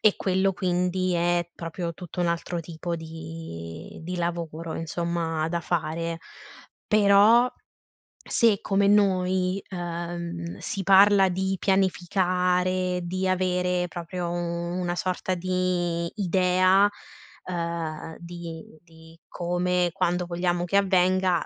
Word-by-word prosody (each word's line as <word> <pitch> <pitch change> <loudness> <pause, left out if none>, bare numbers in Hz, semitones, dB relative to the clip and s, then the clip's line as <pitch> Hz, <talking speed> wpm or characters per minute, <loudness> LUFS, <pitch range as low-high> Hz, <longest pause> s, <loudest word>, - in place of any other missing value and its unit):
e 215 - +5
quello, 190 0 +1
quindi, 180 0 0
è 175 0 +1
proprio 170 +1 -5
tutto 180 +1 -7
un 175 - +2
altro 170 0 -2
tipo 170 +1 -5
di 160 - -8
di 180 +2 -4
lavoro, 170 -2 -3
insomma, 165 -1 -2
da 170 0 -1
fare, 165 0 -2 0.7
però, 215 +4 +5 0.7
se 225 -5 +3
come 200 0 +2
noi, 185 -2 +2
ehm, 170 -1 -5
si 195 - -4
parla 195 0 +6
di 190 +1 -1
pianificare, 180 -1 +1
di 185 +2 -2
avere 180 -1 +1
proprio, 175 +1 -5
u - - -3 0.5
una 175 -1 -1
sorta 185 +1 -1
di 175 -2 -1
idea, 185 +2 +4 0.6
ehm, 170 -2 -4
di 170 -2 -9
di 165 -1 -17
come, 180 0 0
quando, 175 +1 0
vogliamo 175 0 0
che 195 +3 +1
avvenga, 185 -2 +2
180 Hz, 110 wpm, -26 LUFS, 170-185 Hz, 0.7 s, parla